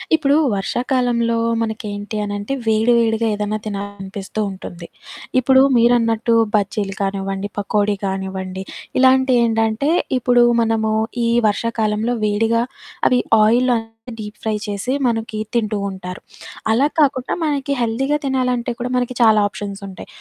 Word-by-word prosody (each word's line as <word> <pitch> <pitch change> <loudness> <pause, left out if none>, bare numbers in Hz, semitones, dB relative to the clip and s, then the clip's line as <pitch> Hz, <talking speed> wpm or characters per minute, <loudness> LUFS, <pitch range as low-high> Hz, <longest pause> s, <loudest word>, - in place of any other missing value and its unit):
ఇప్పుడు 285 -2 +2 0.2
వర్షాకాలంలో 235 +2 0 0.2
మనకేంటి 215 -1 -4
అనంటే, 205 +5 -4
వేడి, 220 +2 +3
వేడిగా 225 0 +1
ఏదన్నా 210 +1 -2
తినాలనిపిస్తుంటుంది. 200 -2 -5 0.5
ఇప్పుడూ 260 +1 +5 0.2
మీరన్నట్టు 230 -1 +3 0.2
బజ్జీలు 200 -1 -1
కానివ్వండి, 195 0 -2
పకోడీ 205 0 0
గానివ్వండి, 190 -1 -4 0.4
ఇలాంటియేంటంటే 245 -2 +3 0.3
ఇప్పుడు 245 0 +4 0.2
మనము 225 -1 +1 0.3
ఈ - - +2 0.2
వర్షాకాలంలో 220 +1 0
వేడిగా 225 +2 +1 0.5
అవి 250 - +3 0.2
ఆయిల్‌లో 240 +3 +3 0.4
డీప్ 210 -1 -7
ఫ్రై 220 -1 0
చేసి 205 +5 -3 0.2
మనకి 225 -2 -2 0.2
తింటూ 215 -3 0
ఉంటారు. 185 -1 -7 0.5
అలా 240 +6 +3
కాకుండా 270 -3 +2
మనకి 280 -2 -1
హెల్దీగా 265 +5 0
తినాలంటే 250 -2 0
కూడా 245 - -3
మనకి 250 0 0
చాలా 220 -2 +6
ఆప్షన్సుంటాయి. 200 -2 -8
220 Hz, 110 wpm, -19 LUFS, 205-245 Hz, 0.5 s, చాలా